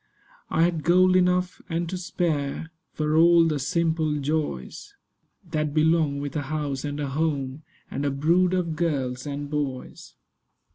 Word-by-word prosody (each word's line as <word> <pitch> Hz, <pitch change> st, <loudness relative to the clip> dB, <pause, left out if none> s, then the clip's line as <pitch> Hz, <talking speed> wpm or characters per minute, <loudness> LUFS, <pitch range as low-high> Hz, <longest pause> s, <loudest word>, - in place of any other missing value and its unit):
I 165 Hz, -, +2 dB
had 170 Hz, -2 st, +1 dB
gold 185 Hz, +2 st, +5 dB
enough 180 Hz, 0 st, +2 dB
and 170 Hz, 0 st, -1 dB
to 185 Hz, -, -3 dB
spare 165 Hz, -4 st, -2 dB, 0.2 s
For 150 Hz, 0 st, -1 dB
all 170 Hz, +1 st, +6 dB
of 165 Hz, -, +2 dB
the 150 Hz, -2 st, -1 dB
simple 160 Hz, 0 st, 0 dB
joys 145 Hz, -, -3 dB, 0.6 s
That 150 Hz, -1 st, -1 dB
belong 155 Hz, -2 st, +2 dB
with 140 Hz, -1 st, -5 dB
a 150 Hz, -, 0 dB
house 145 Hz, -3 st, -2 dB
and 145 Hz, 0 st, -4 dB
a 145 Hz, -2 st, -2 dB
home 140 Hz, -1 st, -2 dB, 0.3 s
And 140 Hz, -, -3 dB
a 145 Hz, -, +1 dB
brood 170 Hz, +6 st, +2 dB
of 170 Hz, -3 st, -1 dB
girls 140 Hz, -5 st, -2 dB
and 145 Hz, 0 st, -4 dB
boys. 145 Hz, -3 st, -5 dB
155 Hz, 155 wpm, -25 LUFS, 145-170 Hz, 0.6 s, all